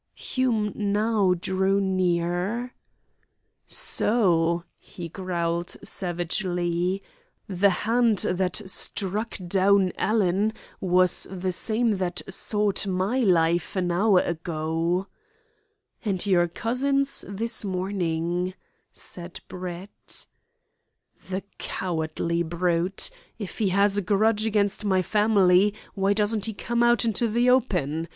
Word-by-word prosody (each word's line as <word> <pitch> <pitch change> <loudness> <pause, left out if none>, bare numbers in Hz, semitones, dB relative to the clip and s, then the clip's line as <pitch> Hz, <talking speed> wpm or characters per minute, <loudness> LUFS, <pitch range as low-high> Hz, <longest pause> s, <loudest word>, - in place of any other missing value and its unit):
Hume 230 -5 -1
now 205 -2 +1
drew 190 +2 +1
near. 185 +5 0 0.9
"So," 170 -6 +2 0.2
he 175 -2 -9
growled 170 -1 -3
savagely, 175 0 -1 0.4
"the 200 0 +3
hand 225 +3 +2
that 185 +3 -1
struck 200 +3 -1
down 195 0 +3
Alan 210 0 +1 0.3
was 185 -1 +3
the 185 0 -3
same 225 +5 +1
that 175 -1 -2
sought 200 +1 +1
my 190 +7 0
life 175 -6 +2
an 180 -2 0
hour 190 +1 +4
ago!" 165 +2 -2 1.0
"And 195 -5 0
your 175 -3 +3
cousin's 275 +8 0
this 225 +3 -1
morning," 180 -2 -2 0.4
said 175 -1 -8
Brett 180 +2 -8 1.0
"The 190 +1 -3 0.2
cowardly 170 -1 -2
brute! 170 +2 0 0.3
If 205 -4 -7
he 210 -4 +2
has 200 +2 +3
a - - +2
grudge 215 +2 +2
against 205 -1 0
my 190 -2 +2
family, 205 -1 +3 0.2
why 195 0 +1
doesn't 210 0 0
he 220 - -4
come 235 +3 -1
out 240 0 +4
into 230 +1 +1
the 240 +3 +3
open? 165 - +1
190 Hz, 105 wpm, -25 LUFS, 175-210 Hz, 1.0 s, hour